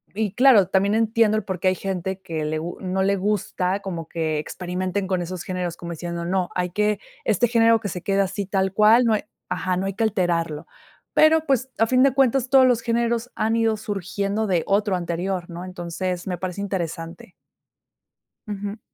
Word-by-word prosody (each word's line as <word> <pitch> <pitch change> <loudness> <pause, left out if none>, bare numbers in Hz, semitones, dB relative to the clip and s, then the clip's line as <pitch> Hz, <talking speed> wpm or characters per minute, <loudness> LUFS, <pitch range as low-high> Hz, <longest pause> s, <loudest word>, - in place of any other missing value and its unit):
y 210 -2 -1
claro, 245 -7 +6
también 200 +2 +2
entiendo, 225 -1 +3
el 215 - -2
por 185 -2 -4
qué 185 - 0
hay 185 - 0
gente 190 0 -3
que 165 -5 -4
le 155 +1 -1
gu 170 +3 -6
no 190 0 -1
le 200 +1 +2
gusta, 195 -1 -1
como 170 -5 -5
que 160 -2 -2
experimenten 185 +4 -3
con 185 -1 0
esos 175 0 -5
géneros. 180 -2 -3
Como 170 0 -7
diciendo: 170 +1 -5
"No, 185 0 0
hay 180 -1 -1
que 210 +2 +1 0.3
este 225 +4 +2
género 230 -1 +4
que 205 - -3
se 180 0 -5
quede 195 0 +2
así, 195 +1 -2
tal 190 -1 0
cual. 220 +4 +5
No 225 - +3
hay". 215 - 0 0.3
Ajá. 180 +2 -1
"...no 190 - -1
hay 195 - -3
que 225 - 0
alterarlo". 170 -7 -1 0.5
Pero, 315 +1 +5
pues, 265 -3 +1
a 225 - +5
fin 255 +2 +3
de 275 -2 +4
cuentas, 265 -1 +2
todos 265 -1 +6
los 245 -2 +2
géneros 235 +1 0
han 220 +1 +1
ido 225 -1 +2
surgiendo 200 +1 -2
de 180 -4 +1
otro 200 -1 +2
anterior, 175 +1 -3
¿no? 175 +1 -7
Entonces, 180 0 -4
me 180 -1 -2
parece 185 +1 -4
interesante. 170 -3 -5 1.1
Ujú. 205 0 -5
195 Hz, 195 wpm, -23 LUFS, 180-220 Hz, 1.1 s, claro